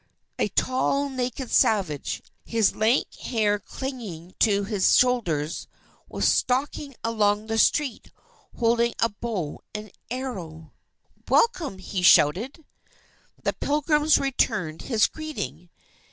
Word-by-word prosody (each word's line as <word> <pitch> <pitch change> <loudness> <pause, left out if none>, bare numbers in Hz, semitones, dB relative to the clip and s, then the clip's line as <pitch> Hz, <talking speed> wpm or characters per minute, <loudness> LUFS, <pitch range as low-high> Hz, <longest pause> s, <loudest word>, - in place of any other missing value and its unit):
A - - +2
tall 275 +2 0
naked 255 -1 -3
savage, 185 -10 +1 0.2
his 225 -4 +1
lank 225 +5 +1
hair 210 -4 0
clinging 210 -11 -7
to 205 -3 +3
his 200 -2 +3
shoulders, 175 -12 +1 0.4
was - - 0
stalking 275 +2 0
along 210 -2 +1
the 225 0 -1
street, 280 -3 +1 0.5
holding 235 0 +2
a 230 - +2
bow 205 -8 -5
and 210 -1 -6 0.2
arrows. 185 -11 -6 0.6
"Welcome!" 345 - +2
he 190 0 -4
shouted. 210 - +4 0.8
The - - 0
Pilgrims 300 +1 +2
returned 210 - -1
his 225 -5 +2
greeting. 310 - -6
225 Hz, 110 wpm, -25 LUFS, 195-260 Hz, 0.8 s, shouted